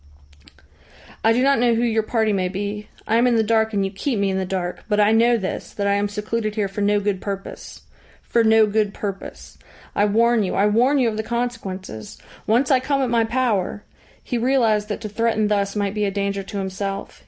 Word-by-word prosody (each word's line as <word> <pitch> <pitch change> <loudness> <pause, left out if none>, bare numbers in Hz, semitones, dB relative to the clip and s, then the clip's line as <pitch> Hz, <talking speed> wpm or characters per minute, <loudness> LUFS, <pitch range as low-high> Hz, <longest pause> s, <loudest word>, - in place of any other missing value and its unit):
"I 225 - +5
do 245 +3 +2
not 275 -1 +3
know 240 -1 +3
who 230 - 0
your 225 -2 +2
party 220 -1 0
may 185 -2 0
be. 205 +2 -4 0.2
I 225 - +2
am 240 +2 +4
in 245 - +3
the 225 - +3
dark, 220 0 +2
and 200 -2 0
you 195 - -3
keep 230 +5 -2
me 200 -1 +1
in 190 - -1
the 190 - -3
dark. 180 -2 -3
But 210 0 +2
I 210 +1 +5
know 235 +2 +4
this, 190 -4 -5
that 200 - -2
I 200 - +2
am 200 0 0
secluded 215 +1 -3
here 210 -3 0
for 195 +2 -5
no 205 0 +3
good 205 -2 -2
purpose. 195 -1 -7 0.4
For 235 - +1
no 220 0 +5
good 210 -1 0
purpose. 195 -2 -7 0.4
I 205 - +3
warn 230 +2 +3
you, 190 - -1
I 200 - +3
warn 240 +7 +3
you 255 -3 +3
of 215 -1 -2
the - - 0
consequences. 220 - -5 0.3
Once 245 +6 +2
I 260 - +5
come 275 +1 0
at 250 - -1
my 230 -1 +3
power 220 -4 -1 0.2
" - - -30
He 245 - -2
realised 230 -4 +2
that 210 - -4
to 215 - -5
threaten 220 0 0
thus 200 -1 0
might 200 -1 -1
be 210 -1 0
a - - +1
danger 200 0 -2
to 200 +2 -7
himself. 195 +1 -4
210 Hz, 230 wpm, -22 LUFS, 200-230 Hz, 0.4 s, I